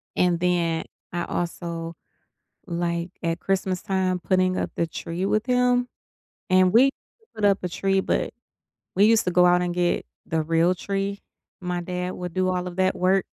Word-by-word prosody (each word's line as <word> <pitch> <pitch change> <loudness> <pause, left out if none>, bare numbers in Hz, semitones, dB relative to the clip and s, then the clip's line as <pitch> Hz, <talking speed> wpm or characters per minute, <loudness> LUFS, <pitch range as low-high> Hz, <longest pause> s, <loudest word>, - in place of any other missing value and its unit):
And 175 -2 +2
then 170 -2 +1 0.3
I 175 - -1
also, 170 -1 -4 0.7
like, 170 0 -2
at 165 0 -1
Christmas 190 0 -1
time, 190 -2 0
putting 185 0 +1
up - - -2
the 170 - 0
tree 165 +3 -4
with 215 +2 +1
him, 250 -1 +2 0.6
and 185 0 +4
we 255 +4 +7 0.5
put 215 -2 0
up 200 -1 +3
a 180 - -1
tree, 195 +2 +1
but - - -1 0.6
we 200 +2 +5
used 225 0 +4
to 180 - 0
go 180 0 +5
out 180 0 +4
and 175 -1 -2
get 175 -1 +1 0.2
the 160 0 0
real 165 +3 +2
tree. 200 +2 -3 0.4
My 180 -1 -2
dad 180 +1 -3
would 180 -2 -6
do 185 0 +1
all 180 0 -2
of 180 -1 -6
that 185 0 +2
work 185 +1 +2
180 Hz, 175 wpm, -24 LUFS, 175-195 Hz, 0.7 s, we